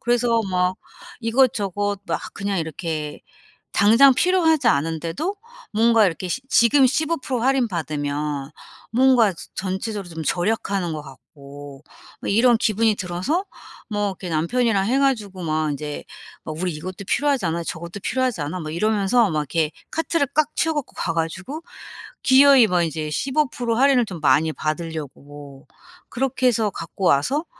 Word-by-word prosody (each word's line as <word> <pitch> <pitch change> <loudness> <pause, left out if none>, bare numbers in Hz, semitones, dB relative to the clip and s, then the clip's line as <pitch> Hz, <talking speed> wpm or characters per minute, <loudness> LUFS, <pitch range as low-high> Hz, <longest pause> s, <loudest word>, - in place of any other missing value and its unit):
그래서 240 -1 +2
막 180 0 +1 0.4
이것저것 205 -5 +1
막 - - -2
그냥 200 -1 -2
이렇게 155 -1 -4 0.5
당장 230 +6 +6
필요하지 320 -3 +2
않은데도 165 - 0 0.4
뭔가 225 -1 +4
이렇게 180 +1 -3
시 255 - -2
지금 260 +2 +5
15% 280 -3 -1
할인 265 -1 +2
받으면 150 -4 -3 0.4
뭔가 245 -3 +4
저 - - -10
전체적으로 195 +1 -4
좀 160 0 -5
절약하는 190 0 -1
거 150 - -5
같고 140 +1 -13 0.4
뭐 - - -5
이런 235 +3 +4
기분이 220 -1 +2
들어서 185 - -2 0.5
뭐 205 -1 0
이렇게 185 -2 -7
남편이랑 195 +6 +1
해 255 +5 +2
가지고 215 -9 0
막 155 -1 -1
인제 145 +1 -6 0.4
막 155 -1 -6
"우리 180 0 -1
이것도 185 +5 -7
필요하지 280 -6 +1
않아? 165 +1 -1
저것도 170 +4 -6
필요하지 255 -4 -1
않아?" 150 +5 -3
막 155 -1 -5
이러면서 215 +3 +2
막 155 - -1
이렇게 150 +1 -1 0.2
카트를 325 -2 0
꽉 305 -1 +3
채워 320 0 +1
갖고 290 - -4
가 170 - -2
가지고 190 - -4 0.6
기어이 265 -2 +7
막 180 -2 +2
인제 155 -1 -3
15% 255 - -1
할인을 260 -1 +4
좀 180 -6 -8
많이 150 +3 +3
받으려고 145 -3 -6 0.4
그렇게 260 0 0
해서 225 -3 +2
갖고 175 +2 -8
와서 180 - +2
200 Hz, 315 characters per minute, -22 LUFS, 160-250 Hz, 0.6 s, 기어이